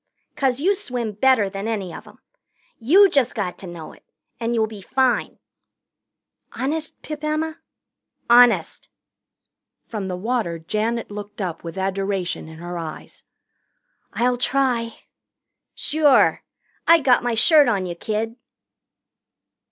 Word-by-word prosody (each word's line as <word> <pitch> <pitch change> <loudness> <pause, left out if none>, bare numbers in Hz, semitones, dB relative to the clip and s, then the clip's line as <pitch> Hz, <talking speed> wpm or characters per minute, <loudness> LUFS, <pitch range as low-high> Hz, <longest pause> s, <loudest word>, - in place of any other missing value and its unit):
'Cause 265 -2 0
you 375 +7 +3
swim 250 - -4
better 220 0 +3
than 195 +2 -5
any 200 -6 -3
of - - -10
'em. - - -16 0.6
You 355 - +6
just 280 -9 +1
got 190 -4 -3
to 190 - -9
know 170 -2 -9
it, - - -20 0.4
and 235 0 -1
you'll 220 -1 +2
be 215 -2 -10
fine." 260 +4 0 1.2
"Honest, 310 +4 -3
Pip 305 -1 -7
Emma?" 310 +1 -2 0.7
"Honest." 240 0 +4 0.9
From 210 -4 -5
the 180 -1 -4
water 215 -4 -2
Janet 215 +8 -2
looked 205 0 -8
up 180 -5 -4
with 170 +2 -7
adoration 195 -2 -2
in 160 0 -11
her 175 +1 -6
eyes. 160 -2 -8 0.9
"I'll 245 +1 +1
try." 245 -3 0 0.7
"Sure. 295 -3 +3 0.5
I 335 - +8
got 260 -4 +4
my 245 -1 -1
shirt 295 +5 +5
on 200 -5 +1
you, 175 - -4
kid." 220 +6 -3
230 Hz, 130 wpm, -22 LUFS, 195-265 Hz, 1.2 s, I